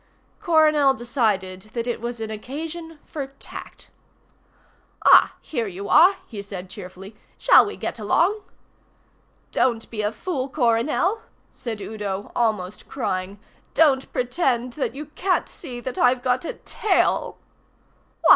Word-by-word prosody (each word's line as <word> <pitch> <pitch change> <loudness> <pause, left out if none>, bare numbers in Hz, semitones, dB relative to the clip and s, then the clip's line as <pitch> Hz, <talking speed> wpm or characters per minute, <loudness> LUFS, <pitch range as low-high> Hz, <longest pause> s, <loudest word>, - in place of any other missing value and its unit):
Coronel 305 -4 +4
decided 215 -7 0
that 235 -1 -2
it 240 -2 -2
was 235 0 -4
an 220 -1 -4
occasion 320 +8 -6
for 280 -3 -5
tact. - - -10 1.1
"Ah, - - +7
here 235 -7 -3
you 195 +1 -6
are," 375 +3 +7
he 210 -3 -7
said 190 -2 -8
cheerfully. 195 +1 -10 0.2
"Shall - - +6
we 415 - -6
get - - -4
along?" 355 - +2 1.1
"Don't 235 -3 +1
be 215 -2 -2
a 210 0 0
fool, 270 +2 -3
Coronel," 285 - +1 0.3
said 225 -4 -6
Udo, 205 -2 -4
almost 210 -5 -1
crying. 195 -5 -3 0.4
"Don't 280 -4 +4
pretend 250 -2 0
that 270 -1 -2
you 300 +2 -5
can't 360 +5 0
see 255 -7 -8
that 250 +1 -5
I've 250 0 +3
got 255 +3 +1
a - - -3
tail." 400 -4 0
245 Hz, 130 wpm, -23 LUFS, 210-300 Hz, 1.1 s, Ah